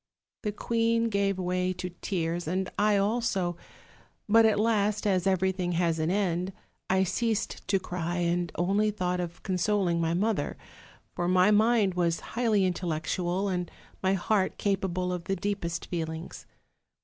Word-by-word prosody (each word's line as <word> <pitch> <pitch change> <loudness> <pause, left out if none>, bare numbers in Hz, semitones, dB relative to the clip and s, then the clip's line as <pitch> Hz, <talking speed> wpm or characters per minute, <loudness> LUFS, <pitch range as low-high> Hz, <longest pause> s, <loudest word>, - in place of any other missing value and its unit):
The 210 - -1
queen 230 +1 +1
gave 200 -2 +1
way 180 0 0
to 180 0 -5
tears, 170 -3 -2
and 185 +2 -1
I 210 0 +3
also; 200 -4 0 0.7
but 225 +1 +6
at 210 -2 +2
last, 210 -1 +1
as 190 -3 +2
everything 185 -1 +1
has 170 -1 +1
an 155 +1 0
end, 185 -1 0 0.4
I 190 0 +3
ceased 220 +4 -1
to 195 - +2
cry, 175 -1 -3
and 175 0 0
only 200 +5 +2
thought 180 -3 -1
of 175 -1 -5
consoling 185 -2 +1
my 165 0 +1
mother; 200 -5 0 0.6
for 175 - -1
my 185 +3 +4
mind 215 -2 +4
was 170 -2 0
highly 225 -5 +2
intellectual, 175 +2 -1
and 180 -2 -2 0.3
my 190 0 +2
heart 195 +1 0
capable 185 -2 -1
of 175 -1 -5
the 195 - 0
deepest 175 -3 -3
feelings. 160 -1 -5
185 Hz, 150 wpm, -28 LUFS, 175-205 Hz, 0.7 s, but